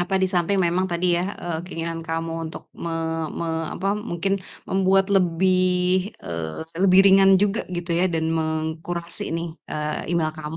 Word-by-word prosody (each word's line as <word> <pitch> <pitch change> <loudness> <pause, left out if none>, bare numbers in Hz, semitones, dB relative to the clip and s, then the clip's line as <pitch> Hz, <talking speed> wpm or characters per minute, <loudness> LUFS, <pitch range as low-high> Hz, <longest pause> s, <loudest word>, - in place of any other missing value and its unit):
apa 180 +2 -1
di 190 - +3
samping 185 +1 +1
memang 185 +1 +1
tadi 175 +1 +1
ya, 170 - +1 0.2
eee, 170 -2 -3
keinginan 165 -2 -4
kamu 165 0 -3 0.2
untuk - - -10
me 170 - -5 0.4
me 170 - -4 0.3
apa 195 +2 0
mungkin 195 -2 -2 0.3
membuat 195 0 +3
lebih, 185 +1 +2
eee, 80 -2 -5 0.2
lebih 190 -1 +7
ringan 195 0 +6
juga 205 +3 +1
gitu 175 -1 -2
ya, 180 +2 +2
dan 160 -1 0
mengkurasi 160 +2 -2
nih, 165 +1 -2 0.2
eee, 150 +1 -3
email 160 -2 +1
kamu. 155 +1 -6
175 Hz, 160 wpm, -23 LUFS, 165-190 Hz, 0.4 s, lebih